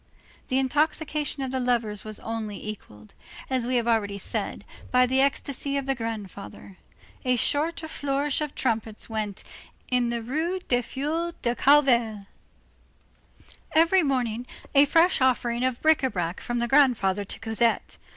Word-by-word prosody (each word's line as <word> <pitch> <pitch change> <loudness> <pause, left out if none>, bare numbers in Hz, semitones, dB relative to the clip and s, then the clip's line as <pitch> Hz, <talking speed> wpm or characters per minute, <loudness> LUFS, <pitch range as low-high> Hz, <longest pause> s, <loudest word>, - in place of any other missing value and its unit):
The 260 - 0
intoxication 295 +1 0
of 260 - -3
the 260 - -1
lovers 235 -5 0
was 215 -1 -6
only 215 -2 -5
equalled, 105 - -10 0.4
as 255 -2 0
we 255 - 0
have 235 -1 +1
already 205 -4 +1
said, 200 - -4 0.2
by 250 0 +5
the 260 +2 +2
ecstasy 280 0 0
of 275 - -2
the 270 - +1
grandfather. 210 -5 -7 0.4
A 255 -1 +2
sort 300 +7 +1
of 315 - -7
flourish 280 +1 -1
of 300 -2 -4
trumpets 225 -2 -2
went 215 -3 -3
on - - -17 0.3
in 240 -1 0
the 235 -1 -2
Rue 320 +10 -1
des 245 -1 +2
Filles 315 +7 -3
du 240 -1 +2
Calvaire. 240 -7 +3 1.5
Every 335 +4 +5
morning, 250 -5 -1 0.3
a 280 +1 +7
fresh 330 +2 +3
offering 245 -1 +1
of 255 -2 0
bric 315 0 +5
à 265 - 0
brac 175 -3 -3
from 240 - -3
the 240 0 0
grandfather 235 -8 +3
to 195 - -6
Cosette. 225 +1 0
250 Hz, 160 wpm, -26 LUFS, 225-280 Hz, 1.5 s, a